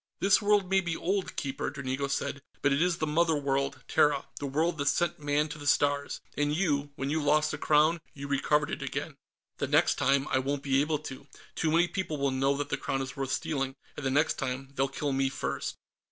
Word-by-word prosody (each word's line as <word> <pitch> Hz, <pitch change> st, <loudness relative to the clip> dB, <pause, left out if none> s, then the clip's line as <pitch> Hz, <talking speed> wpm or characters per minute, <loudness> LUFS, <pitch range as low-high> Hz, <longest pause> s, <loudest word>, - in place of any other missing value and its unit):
"This 195 Hz, +2 st, +4 dB
world 205 Hz, -2 st, +3 dB
may 190 Hz, +1 st, +3 dB
be 170 Hz, -2 st, -2 dB
old, 190 Hz, +2 st, -1 dB
Keeper," 135 Hz, -1 st, -2 dB
Dranigo 140 Hz, -1 st, -3 dB
said, 140 Hz, +1 st, -2 dB, 0.2 s
"but 140 Hz, 0 st, +4 dB
it 140 Hz, -, +1 dB
is 175 Hz, -1 st, +2 dB
the 155 Hz, -, -1 dB
Mother 160 Hz, +1 st, +2 dB
World, 140 Hz, -1 st, -1 dB
Terra, 145 Hz, -2 st, +3 dB
the 145 Hz, -, -3 dB
world 155 Hz, +4 st, 0 dB
that 140 Hz, -, -1 dB
sent 165 Hz, +4 st, +1 dB
Man 145 Hz, +1 st, +1 dB
to 150 Hz, +1 st, -7 dB
the 145 Hz, -, -6 dB
Stars. 145 Hz, 0 st, +1 dB
And 145 Hz, 0 st, +1 dB
you 145 Hz, -5 st, +1 dB
when 135 Hz, +1 st, -3 dB
you 160 Hz, +1 st, +1 dB
lost 150 Hz, +1 st, +3 dB
the -, -, -5 dB
Crown, 155 Hz, +2 st, +3 dB
you 140 Hz, 0 st, -7 dB
recovered 145 Hz, +1 st, +1 dB
it -, -, -4 dB
again." 140 Hz, +2 st, -4 dB, 0.4 s
"The 140 Hz, -, 0 dB
next 150 Hz, +4 st, +3 dB
time, 140 Hz, 0 st, +2 dB
I 130 Hz, -, +2 dB
won't 140 Hz, +1 st, -2 dB
be 135 Hz, -1 st, +3 dB
able 150 Hz, +1 st, +1 dB
to. 140 Hz, -2 st, -9 dB, 0.3 s
Too 160 Hz, -, 0 dB
many 170 Hz, +2 st, +4 dB
people 180 Hz, -5 st, -3 dB
will 140 Hz, -1 st, +1 dB
know 135 Hz, +1 st, +1 dB
that 145 Hz, -1 st, -3 dB
the -, -, 0 dB
Crown 135 Hz, 0 st, -2 dB
is 130 Hz, -, -7 dB
worth 135 Hz, -1 st, -3 dB
stealing, 135 Hz, -2 st, -1 dB, 0.2 s
and -, -, -7 dB
the 135 Hz, -, +1 dB
next 145 Hz, +4 st, +2 dB
time, 130 Hz, +1 st, -3 dB
they'll 135 Hz, 0 st, +1 dB
kill 140 Hz, +1 st, -3 dB
me 135 Hz, 0 st, +1 dB
first." -, -, -3 dB
145 Hz, 225 wpm, -29 LUFS, 135-155 Hz, 0.4 s, This